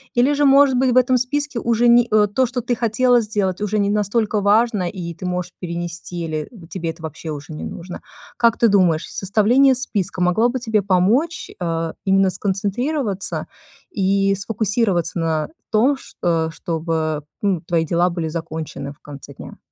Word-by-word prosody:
Или 255 +4 +3
же, 290 0 +2
может 275 -1 +6
быть, 260 -1 +3
в 250 - +2
этом 255 0 +4
списке 285 +1 -2
уже 235 +1 +2
не 240 0 +5
э, 215 -1 +5
то, 250 +5 +1
что 245 +1 -3
ты 245 +1 -1
хотела 240 +2 +3
сделать, 205 -3 -2
уже 210 +1 -1
не 200 0 +1
настолько 210 0 0
важно, 205 -3 +2
и 170 -4 -6
ты 185 - -9
можешь 180 0 -3
перенести, 175 0 -5
или 155 -1 -4 0.2
тебе 170 -3 -3
это 165 0 -8
вообще 160 +1 -7
уже 150 +1 -6
не - - -7
нужно. 175 +1 -7 0.4
Как 235 -1 +3
ты 235 - +4
думаешь, 180 -6 +3
составление 235 +7 +3
списка 200 -8 -3
могло 200 +7 +3
бы 255 +1 -2
тебе 220 -3 +1
помочь, 210 - +1
э, 165 -2 -2
именно 195 -1 +3
сконцентрироваться 205 - -2 0.5
и 195 - +2
сфокусироваться 200 -4 -1
на 160 -2 -1 0.2
том 250 +6 +3
ш - - -16
э, 165 -2 +1
чтобы, 160 -2 -2 0.2
ну, 190 -5 +1
твои 165 -1 0
дела 175 +3 +2
были 170 -2 -3
закончены 155 -3 -5
в 145 - -17
конце 140 -1 -11
дня? - - -10
195 Hz, 175 wpm, -20 LUFS, 170-235 Hz, 0.5 s, может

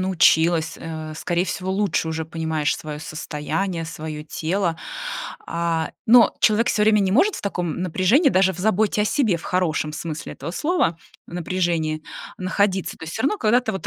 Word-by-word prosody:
научилась, 170 -3 +3
э, 155 -1 -6
скорее 175 +1 0
всего, 185 +1 -3
лучше 195 -4 0
уже 160 0 -2
понимаешь 160 -2 -1
своё 150 -2 -6
состояние, 165 +3 -3
своё 155 -1 -6
тело. 165 +2 -1 0.7
А, 170 -1 -1 0.2
но 235 +1 +7
человек 220 +3 +3
всё 210 - +2
время 210 0 +5
не 190 -1 +1
может 380 - +3
в - - -6
таком 180 -4 -2
напряжении, 190 - +3
даже 190 0 +3
в 180 - -11
заботе 210 +1 +2
о - - +1
себе, 215 -3 +2
в 170 - -10
хорошем 160 -4 0
смысле 155 -1 -5
этого - - -6
слова, 295 - +1 0.3
напряжении 170 -3 -1 0.4
находиться. 190 0 0
То - - -9
есть 160 - -7
всё - - -2
равно 405 +11 +1
когда-то 225 +1 +2
вот 190 - -5
175 Hz, 170 wpm, -22 LUFS, 160-205 Hz, 0.7 s, но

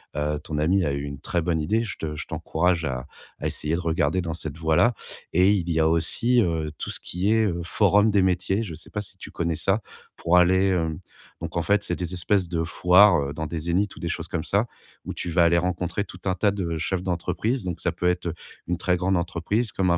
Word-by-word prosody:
Heu, 75 0 -1
ton 75 0 -5
ami 90 +6 +2
a 70 - 0
eu 70 - -2
une 70 -1 -6
très 85 +4 -1
bonne 80 -2 0
idée, 110 +9 +1
je 110 - -6
te 75 -1 -4
je - - -6
t'encourage 85 0 0
à 65 -3 -3 0.3
à - - -7
essayer 75 +2 -1
de - - -2
regarder 80 +1 +1
dans 85 -2 -3
cette 80 -2 -5
voie-là 80 +9 +3 0.4
et 90 +3 +5
il 90 -4 0
y 80 -1 +1
a 80 - +4
aussi, 100 +10 +3
heu, 80 -5 -1
tout - - -4
ce - - 0
qui 95 +4 -1
est, 110 0 +3
heu, 85 -4 -1
forum 105 +4 +3
des 100 -2 +3
métiers, 95 +3 +1
je 95 -7 -6
sais 80 - -9
pas 105 - -3
si 100 -2 -7
tu - - -10
connais 85 -1 -2
ça? 95 +7 +1 0.3
Pour 85 +2 +2
aller, 95 +2 +4
hem 80 -4 0 0.4
donc - - -6
en - - +2
fait, 100 +3 +2
c'est 90 - 0
des 90 0 -4
espèces 90 +1 +1
de 85 -1 -1
foires, 90 +3 +5
heu, 70 0 -3
dans 80 +2 -4
des 80 +2 -4
Zénith 85 +5 0
ou - - -12
des - - -3
choses - - -3
comme - - -2
ça, - - +2 0.4
où - - -4
tu 90 - -4
vas 85 +1 +4
aller 85 0 +4
rencontrer 90 +3 -1
tout 90 - -12
un 95 - +2
tas 100 +2 +2
de 85 -5 -3
chefs 90 +3 -2
d'entreprise, 95 +6 -1
donc 90 -2 -4
ça 85 - +1
peut 90 +1 -2
être, 90 0 0
heu, 85 - -2 0.3
une 90 0 -1
très 90 +1 +1
grande 95 +1 +1
entreprise 90 +6 -1
comme 90 -2 +1
un 85 - +3
90 Hz, 250 wpm, -25 LUFS, 80-95 Hz, 0.4 s, et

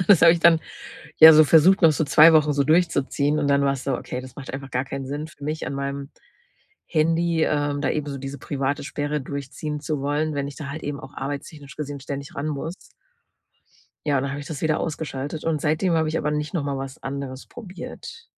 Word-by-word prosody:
äh, 185 - -3
das 195 -5 +7
habe 165 - +9
ich 170 - -1
dann, 165 -1 +6 0.6
ja, 160 0 +12
so 155 +1 +8
versucht, 175 +6 +5
noch 165 - +7
so 160 - 0
2 160 +3 +7
Wochen 150 -1 +4
so 140 - +2
durchzuziehen 150 -2 +1
und 145 - 0
dann 140 0 +3
war's 140 -1 0
so: 135 -2 0
„Okay, 125 - -6
das 130 -1 -12
macht 135 -2 -8
einfach 135 -1 -7
gar 125 +1 0
keinen 135 0 -5
Sinn 145 +3 -4
für 145 -2 -15
mich 155 +2 -3
an - - -4
meinem 140 0 -4 0.8
Handy, 165 0 +1
ähm, 145 -1 0
da - - 0
eben 150 -1 -2
so 140 -1 -4
diese 135 +1 -6
private 140 +1 -2
Sperre 145 0 -3
durchziehen 140 +2 -5
zu 150 -1 -2
wollen, 150 +2 -1
wenn 140 -1 -2
ich 140 - -9
da 145 -3 -6
halt 155 +3 -6
eben 145 -1 -4
auch 135 +1 -11
arbeitstechnisch 140 +1 -7
gesehen 145 -2 -5
ständig 140 +3 -7
ran 140 +2 -3
muss.“ 155 +4 -6 1.1
Ja, 145 -2 +2
und 130 - 0
dann 140 - -3
habe 145 - -5
ich 145 - -9
das 155 -4 -6
wieder 155 -1 +1
ausgeschaltet 150 -1 -4
und 160 -3 0
seitdem 160 +4 +1
habe 160 -1 +1
ich 160 - -1
aber 150 - -1
nicht 150 0 -3
noch 165 -5 -1
mal 140 -1 -2
was 135 0 -7
anderes 135 -1 -6
probiert. 225 - -10
145 Hz, 230 wpm, -23 LUFS, 140-155 Hz, 1.1 s, ja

